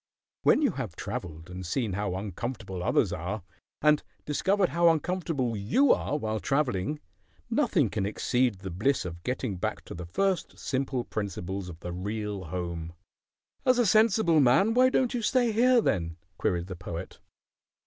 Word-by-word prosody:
When 305 Hz, -, +4 dB
you 280 Hz, -, +3 dB
have 115 Hz, -, -5 dB
travelled 80 Hz, -1 st, -6 dB
and 90 Hz, +1 st, -7 dB
seen 105 Hz, +4 st, -1 dB
how 100 Hz, -1 st, -2 dB
uncomfortable 100 Hz, 0 st, -5 dB
others -, -, +2 dB
are, 90 Hz, +5 st, -4 dB, 0.4 s
and 150 Hz, -1 st, +5 dB, 0.2 s
discovered 190 Hz, +6 st, +2 dB
how 170 Hz, 0 st, +4 dB
uncomfortable 160 Hz, -7 st, 0 dB
you 120 Hz, -, +4 dB
are 145 Hz, -, -1 dB
while 110 Hz, -5 st, -2 dB
travelling, 135 Hz, 0 st, 0 dB, 0.5 s
nothing -, -, +3 dB
can 100 Hz, -2 st, -2 dB
exceed 120 Hz, -1 st, 0 dB
the 95 Hz, -1 st, -5 dB
bliss 110 Hz, +7 st, +1 dB
of 85 Hz, -1 st, -6 dB
getting 125 Hz, -3 st, -2 dB
back -, -, -3 dB
to -, -, -8 dB
the 85 Hz, 0 st, -7 dB
first 185 Hz, -, -1 dB
simple 130 Hz, -2 st, -1 dB
principles 100 Hz, -3 st, -4 dB
of 85 Hz, -1 st, -10 dB
the 90 Hz, -, -5 dB
real 100 Hz, +1 st, -4 dB
home." 85 Hz, -1 st, -4 dB, 0.7 s
"As 255 Hz, -1 st, +4 dB
a 245 Hz, -, +4 dB
sensible 215 Hz, -5 st, +4 dB
man, 140 Hz, -, +4 dB
why 255 Hz, +2 st, +5 dB
don't 260 Hz, 0 st, +1 dB
you 245 Hz, -, -1 dB
stay 240 Hz, +1 st, +2 dB
here, 245 Hz, +2 st, +5 dB
then?" 85 Hz, -, -1 dB, 0.2 s
queried 85 Hz, -1 st, 0 dB
the 95 Hz, -1 st, -6 dB
Poet. 85 Hz, 0 st, -7 dB
110 Hz, 160 wpm, -28 LUFS, -, 0.7 s, and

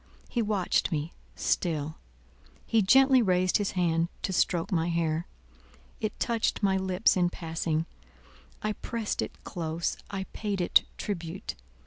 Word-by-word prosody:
He 240 Hz, -, -1 dB
watched 205 Hz, -4 st, +1 dB
me, 155 Hz, +1 st, -2 dB, 0.2 s
still; 155 Hz, -3 st, 0 dB, 0.7 s
he 225 Hz, -, +3 dB
gently 265 Hz, +5 st, +6 dB
raised 185 Hz, -3 st, +3 dB
his 205 Hz, -2 st, -1 dB
hand 170 Hz, -2 st, +2 dB, 0.2 s
to 190 Hz, -, -1 dB
stroke 175 Hz, 0 st, +1 dB
my 170 Hz, -2 st, +1 dB
hair; 165 Hz, 0 st, 0 dB, 0.7 s
it 215 Hz, -1 st, -3 dB
touched 230 Hz, -3 st, 0 dB
my 195 Hz, -1 st, +4 dB
lips 190 Hz, +1 st, +2 dB
in 175 Hz, -2 st, +3 dB
passing; 165 Hz, -2 st, -2 dB, 0.8 s
I 215 Hz, 0 st, 0 dB
pressed 225 Hz, 0 st, -3 dB
it -, -, -6 dB
close, 165 Hz, -1 st, -2 dB
I 195 Hz, -1 st, -3 dB
paid 205 Hz, -3 st, -2 dB
it 175 Hz, -, +4 dB
tribute. 180 Hz, -1 st, -4 dB
185 Hz, 135 wpm, -29 LUFS, 165-205 Hz, 0.8 s, gently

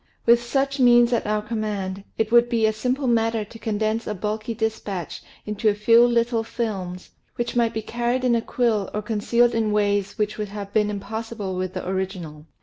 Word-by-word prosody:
With 235 Hz, 0 st, +6 dB
such 275 Hz, +3 st, -1 dB
means 240 Hz, -1 st, +6 dB
at 235 Hz, -, 0 dB
our 210 Hz, 0 st, 0 dB
command, 205 Hz, -3 st, -3 dB
it 220 Hz, 0 st, 0 dB
would 240 Hz, 0 st, +5 dB
be 230 Hz, -2 st, +2 dB
a 220 Hz, -, +2 dB
simple 255 Hz, +5 st, -1 dB
matter 225 Hz, -2 st, +1 dB
to 225 Hz, +2 st, -13 dB
condense 220 Hz, +1 st, -1 dB
a 210 Hz, -, -2 dB
bulky 215 Hz, +3 st, -3 dB
dispatch 215 Hz, -6 st, -3 dB, 0.2 s
into 210 Hz, +1 st, +1 dB
a 205 Hz, -, +1 dB
few 230 Hz, +3 st, +5 dB
little 235 Hz, -1 st, +1 dB
films, 200 Hz, -6 st, -4 dB, 0.2 s
which 240 Hz, 0 st, -3 dB
might 235 Hz, -1 st, +2 dB
be 220 Hz, -, -4 dB
carried 240 Hz, +3 st, -1 dB
in 250 Hz, -1 st, +3 dB
a 230 Hz, -, +2 dB
quill 225 Hz, -5 st, 0 dB
or 210 Hz, -, -2 dB
concealed 235 Hz, +3 st, +2 dB
in 220 Hz, -2 st, +1 dB
ways 205 Hz, -1 st, 0 dB
which 210 Hz, 0 st, -1 dB
would 210 Hz, -1 st, -3 dB
have 200 Hz, 0 st, -7 dB
been 210 Hz, -1 st, +2 dB
impossible 210 Hz, -1 st, -5 dB
with 185 Hz, +1 st, -3 dB
the 185 Hz, -, -2 dB
origi 190 Hz, +1 st, -3 dB
nal. 155 Hz, -2 st, -10 dB
220 Hz, 200 wpm, -23 LUFS, 205-235 Hz, 0.2 s, With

